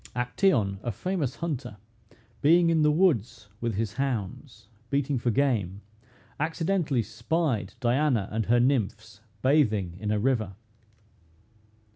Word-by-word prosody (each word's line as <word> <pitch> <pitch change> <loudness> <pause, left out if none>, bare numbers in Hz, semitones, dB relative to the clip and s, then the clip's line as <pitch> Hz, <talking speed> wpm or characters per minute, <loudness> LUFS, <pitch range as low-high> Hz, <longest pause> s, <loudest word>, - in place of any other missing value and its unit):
Actæon, 125 - +1
a 120 - -2
famous 155 - -2
hunter, 145 -10 -4 0.6
being 170 +3 +5
in 160 -1 +3
the 150 - +4
woods 120 - +1
with 115 -3 -1
his 105 0 -2
hounds, 115 -2 -4 0.2
beating 140 -1 0
for 120 - 0
game, 110 -7 0 0.6
accidentally 160 -4 0
spied 120 - -2
Diana 125 -4 +1
and 110 0 -2
her 120 +2 +4
nymphs 110 -4 -1 0.2
bathing 110 - +2
in 105 - -3
a 105 - +1
river. 110 -4 0
120 Hz, 120 wpm, -27 LUFS, 105-150 Hz, 0.6 s, being